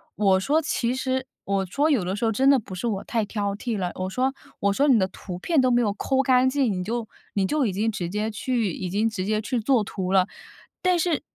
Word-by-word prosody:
我 195 -2 +3
说 290 +10 +2
其 250 -5 -1
实 260 0 -2 0.2
我 195 -1 0
说 290 - +1
有 250 -10 +2
的 185 +2 -2
时 210 - -1
候 225 - +2
真 265 +5 +3
的 275 - +6
不 200 -4 -10
是 210 +6 -3
我 200 -3 -2
太 225 -3 -1
挑 200 -1 -2
剔 230 +1 -3
了， 180 -2 -2
我 185 0 -3
说 255 +6 0 0.3
我 200 0 +2
说 280 +8 +2
你 260 - +6
的 190 -3 +2
图 180 -1 -8
片 305 - +2
都 255 - +3
没 240 -1 +3
有 210 -4 +1
抠 265 +5 +1
干 255 -1 +4
净， 260 -4 +1
你 180 -1 -3
就 230 +3 -3 0.3
你 195 -2 +1
就 290 +3 +1
已 200 - -1
经 215 +4 0
直 185 -5 -4
接 210 +3 -2
去 225 -1 -1
已 180 +2 -4
经 210 +5 +1
直 215 -4 -3
接 215 +1 +1
去 245 +3 -1
做 230 0 +2
图 190 -2 -4
了。 190 -1 +4 0.5
但 365 -1 +3
是 340 -3 +1
220 Hz, 275 characters per minute, -25 LUFS, 195-260 Hz, 0.5 s, 的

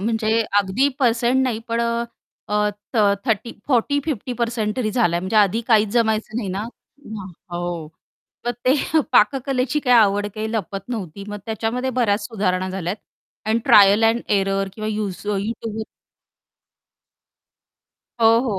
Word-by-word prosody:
म्हणजे 225 +1 +1 0.2
अगदी 205 +8 +2
पर्सेंट 245 0 +2
नाही 250 -4 0
पण 230 0 0 0.7
अ, 210 - 0 0.4
थ - - 0 0.3
30 230 0 0 0.2
40-50% 240 -4 0
तरी 235 -4 0
झालाय, 175 -7 +1
म्हणजे 190 +4 -2
आधी 210 +1 +4
काहीच 215 -2 +4
जमायचं 220 -2 +1
नाही 230 -5 -2
ना 190 +2 -3 0.9
हो. 175 -2 -4 0.6
मग - - +2
ते 255 +1 +4 0.4
पाककलेची 260 +4 +2
काय 250 - +6
आवड 205 -1 +3
काही 220 0 -3
लपत 200 -3 -3
नव्हती 200 -6 -5
मग, 210 - -5
त्याच्यामध्ये 225 +4 -2
बऱ्याच 205 -3 +1
सुधारणा 185 -4 -1
झाल्यात 185 0 -3 0.5
आणि 220 +1 +2
ट्रायल 205 +1 +6
एंड 225 +1 +3 0.2
एरर 195 0 0
किंवा 215 0 -4
यौसो 205 -1 -3
YouTubeवर 220 +1 -4 2.4
हो, 225 - +6
हो. 230 -6 -2
220 Hz, 130 wpm, -21 LUFS, 200-235 Hz, 2.4 s, काय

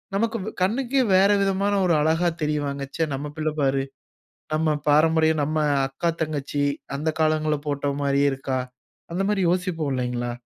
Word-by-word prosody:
நமக்கு 230 +3 0 0.2
கண்ணுக்கே 250 +7 +1
வேற 195 +2 +5
விதமான 195 +1 +1
ஒரு 175 - +3
அழகா 160 +3 +2
தெரிவாங்க. 145 -2 -1
ச்சே 165 - 0
நம்ம 145 +2 -4
பிள்ள 155 0 0
பாரு. 135 -1 +1 0.7
நம்ம 155 0 +1
பாரம்பரியம் 160 +1 +4
நம்ம 155 +2 -1 0.3
அக்கா, 155 +6 -2
தங்கச்சி 145 -2 -2 0.3
அந்த 150 +3 -2
காலங்கள்ல 155 -1 +2
போட்டோ 145 0 -1
மாரியே 140 0 +2
இருக்கா. 135 -1 -2 0.5
அந்த 180 +3 -1
மாரி 205 -2 +1
யோசிப்போம் 175 -4 -1
இல்லைங்களா? 125 -1 -2
155 Hz, 145 wpm, -24 LUFS, 140-180 Hz, 0.7 s, வேற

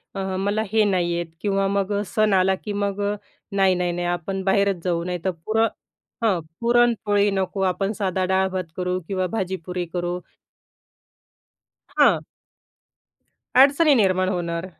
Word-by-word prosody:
अ, - - -3 0.2
मला 205 +2 0
हे 220 0 +4
नाही 175 -3 +1
येत 170 0 -2 0.2
किंवा 195 -1 +1
मग 200 0 -1
अ, 205 - 0
सण 215 0 +1
आला 190 0 +3
की 210 - -4
मग 200 0 -2
अ, 205 0 0 0.4
नाही, 195 -2 +3
नाही, 180 0 0
नाही 175 0 -3
आपण 175 +2 -3
बाहेरच 195 -2 +1
जाऊ, 170 -2 0
नाहीतर 180 +1 -2
पुर 220 +1 0 0.6
हं, 200 -6 +2 0.2
पुरणपोळी 230 -4 +3
नको, 195 0 -2
आपण 195 +2 0
साधा 190 -2 0
डाळ-भात 190 0 0
करू 180 0 -1
किंवा 185 -2 -1
भाजी-पुरी 180 -3 -3
करू 175 0 -2 1.8
हां. - - +5 1.4
अडचणी 285 +4 +6
निर्माण 185 -4 +2
होणार. 170 -2 -2
190 Hz, 140 wpm, -23 LUFS, 180-205 Hz, 1.8 s, अडचणी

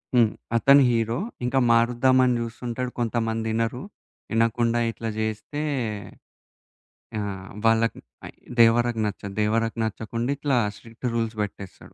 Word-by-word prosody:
హ్మ్. 115 -3 +5 0.3
అతను 140 +4 +6
హీరో. 115 -1 0 0.3
ఇంకా 135 +2 +2
మారుద్దామని 125 +2 +4
చూస్తుంటాడు, 120 +1 -4
కొంతమందినరు, 115 +1 -1 0.5
ఇనకుండా 115 +1 +2
ఇట్లా 115 0 -5
చేస్తే, 110 +7 -3 1.6
ఆహ్, 95 -2 -5 0.2
వాళ్ళకి 115 0 +3 0.6
దేవరకు 115 0 +4
నచ్చదు. 100 -1 -6
దేవరకు 115 +2 0
నచ్చకుండా 115 +3 -3
ఇట్లా 140 -3 +1 0.2
స్ట్రిక్ట్ 115 +3 -7
రూల్స్ 115 -1 -1
పెట్టేస్తాడు. 100 -2 -7
115 Hz, 100 wpm, -25 LUFS, 110-120 Hz, 1.6 s, అతను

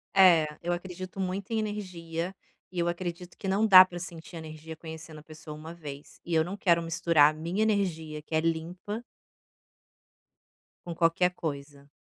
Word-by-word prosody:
É, 175 -5 +7 0.2
eu 175 0 0
acredito 185 +2 -6
muito 190 +3 -3
em 220 - +1
energia, 185 -4 -4 0.4
e 180 - -4
eu 170 - +1
acredito 175 0 -4
que 195 - -6
não 200 +3 +2
dá 185 -3 +10
pra 175 -1 -8
sentir 170 -1 -8
energia 160 0 -8
conhecendo 160 -1 -9
a - - -15
pessoa 155 -1 -10
1 160 +2 -9
vez, 145 -4 -10
e 170 - -3
eu 160 - +5
não 190 +4 -5
quero 170 -4 +3
misturar 165 -2 +4
a 155 - -12
minha 175 +7 -1
energia, 165 -8 -1
que 160 +1 -5
é - - +4
limpa 175 +7 -3 1.8
com 170 - -4
qualquer 170 +2 +3
coisa. 140 -4 -6
170 Hz, 170 wpm, -29 LUFS, 160-185 Hz, 1.8 s, dá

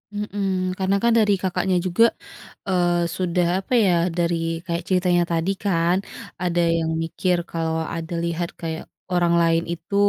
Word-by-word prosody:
Mhm, 205 -1 -3 0.3
karena 190 +1 +1
kan 235 - +4
dari 210 -2 +4
Kakaknya 185 0 0
juga, 185 +6 +3 0.7
eee, 175 -2 +2 0.2
sudah, 180 -1 +1 0.2
apa 195 - -10
ya, 180 - +3 0.3
dari 170 0 +1 0.3
kayak 170 -1 -2
ceritanya 180 -1 +3
tadi 165 +3 0
kan 175 -2 +2 0.5
ada 175 -1 +1 0.2
yang 160 0 -1
mikir 180 +2 0
kalau 165 -1 -1 0.2
ada 165 +1 -5
lihat 170 0 -2
kayak 160 -1 -4 0.3
orang 175 -1 +3
lain 165 0 +3
itu, 170 +3 -7
175 Hz, 150 wpm, -23 LUFS, 170-185 Hz, 0.7 s, kan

